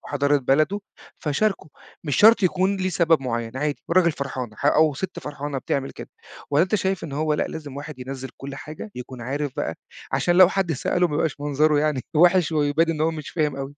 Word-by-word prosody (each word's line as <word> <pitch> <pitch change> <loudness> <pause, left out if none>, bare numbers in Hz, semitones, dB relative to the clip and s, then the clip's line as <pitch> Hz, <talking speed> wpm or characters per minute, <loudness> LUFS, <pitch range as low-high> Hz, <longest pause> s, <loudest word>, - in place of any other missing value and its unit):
حضارة 145 0 +1
بلده 150 +9 +1 0.4
فشارَكه. 180 +3 -1 0.4
مش 145 -3 -1
شرط 220 0 +6
يكون 185 +2 +2
ليه 185 -1 -1
سبب 170 -3 +3
معيَّن، 115 -1 -3
عادي 145 -2 -2
والراجل 170 -1 +4
فرحان، 135 -4 -5
أو 150 +1 +4
ستّ 185 +6 -5
فرحانة 145 -1 -5
بتعمل 135 +1 -2
كده. - - -10 0.4
والّا 145 +2 +4
أنتَ 190 - -2
شايِف 190 -3 0
إن 155 - -7
هو 150 +1 0
لأ، - - 0
لازم 145 -4 -7
واحد 145 -1 -8
ينزِّل 130 +1 -6
كل 135 0 -7
حاجة 155 +10 -8
يكون 125 0 -8
عارِف 140 +3 -3
بقى، 80 - -2 0.4
عشان 175 0 +2
لو 185 -1 +8
حد 190 -3 0
سأله 175 +5 +1
ما 150 - -4
يبقاش 150 -1 -1
منظره 150 +1 +2
يعني 150 -3 +1 0.2
وحِش، 175 0 +4
ويبان 155 +2 +2
إن 155 -2 -3
هو 160 +1 +2
مش 155 -2 -7
فاهم 150 -4 -1
أوي؟ 135 - -3
150 Hz, 200 wpm, -23 LUFS, 140-170 Hz, 0.4 s, لو